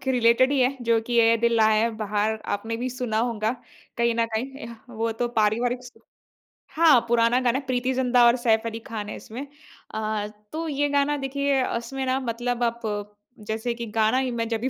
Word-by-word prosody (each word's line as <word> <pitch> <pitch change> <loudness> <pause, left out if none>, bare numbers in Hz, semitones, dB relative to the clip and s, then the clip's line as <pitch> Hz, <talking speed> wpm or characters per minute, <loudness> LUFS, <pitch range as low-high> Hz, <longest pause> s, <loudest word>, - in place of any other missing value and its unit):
के 265 - 0
रिलेटेड 245 +2 +4
ही 280 - +2
है, 255 +2 +2
जो 230 -1 +2
कि 240 -1 +1
"ऐ 230 0 +5
दिल 235 +1 +1
लाया 220 -1 +4
है 235 - 0
बहार" 215 0 -1
आपने 225 +3 -4
भी 245 +2 -3
सुना 245 -3 -2
होगा 225 -1 0 0.5
कहीं 235 0 +2
ना 230 0 +2
कहीं। 225 +4 -3
एह, 235 -4 -8 0.2
वो 230 -1 -2
तो 240 +2 -2
पारिवारिक 240 +4 +1
स 250 - -11 0.8
हाँ, 315 -5 +6
पुराना 235 +1 +3
गाना, 245 +2 +2
प्रीति 255 -1 -1
ज़िंटा 250 -1 +3
और 235 +1 +6
सैफ़ 225 -2 +2
अली 225 0 -5
ख़ान 220 -2 -6
है - - -5
इसमें। 245 +6 -8 0.5
अ, 215 -1 -2 0.2
तो 325 +1 -4
ये 290 -1 0
गाना 285 +1 +1
देखिए, 275 0 0
उसमें 265 +3 -4
ना 260 +1 +1
मतलब 245 0 -2
आप, 235 0 -1 0.7
जैसे 225 +2 -2
कि 235 0 -6
गाना 220 +3 +3
ही 260 -1 0
मैं 230 -1 -2
जब 225 -1 -1
भी 260 - 0
235 Hz, 205 wpm, -25 LUFS, 225-255 Hz, 0.8 s, हाँ